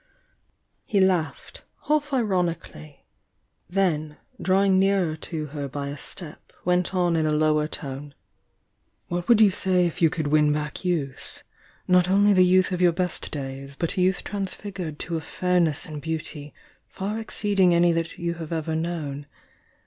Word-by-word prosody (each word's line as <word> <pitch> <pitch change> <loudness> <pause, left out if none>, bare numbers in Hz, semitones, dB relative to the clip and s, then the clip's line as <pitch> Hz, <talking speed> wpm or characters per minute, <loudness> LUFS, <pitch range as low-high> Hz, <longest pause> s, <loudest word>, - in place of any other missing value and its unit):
He 205 - 0
laughed, 185 -4 0 0.2
half 295 -1 +1
ironically, 180 - -2 0.3
— - - -47
then 160 -5 0 0.2
drawing 190 0 +3
nearer 190 -4 +2
to 155 -1 -4
her 145 -2 -3
by 140 +1 -5
a 140 - -5
step, 160 -5 -5
went 180 +1 +1
on 175 -2 +2
in 160 -1 +1
a - - +1
lower 150 0 +2
tone: 140 -1 -6 0.9
"What 175 0 -3
would 235 -2 +6
you 210 -3 +6
say 185 -2 +1
if 170 - -3
you 165 - +6
could 155 0 -3
win 150 0 +3
back 150 +3 -3
youth? 155 -8 -3 0.2
— - - -31
not 180 0 +4
only 200 +2 +5
the 185 -1 +6
youth 185 +1 +4
of 180 -1 -1
your 175 -2 +5
best 180 0 -2
days, 135 -1 -6
but 170 +4 -2
a 185 - +1
youth 185 +1 +1
transfigured 190 -5 -5
to 165 +1 -2
a - - -4
fairness 175 -2 0
and 150 -2 -7
beauty 155 -1 -5 0.4
far 205 +3 -4
exceeding 205 -4 +2
any 170 0 +4
that 165 0 -2
you 170 0 -2
have 165 -1 -8
ever 160 -1 -2
known? 155 -4 -3
170 Hz, 165 wpm, -25 LUFS, 155-185 Hz, 0.9 s, would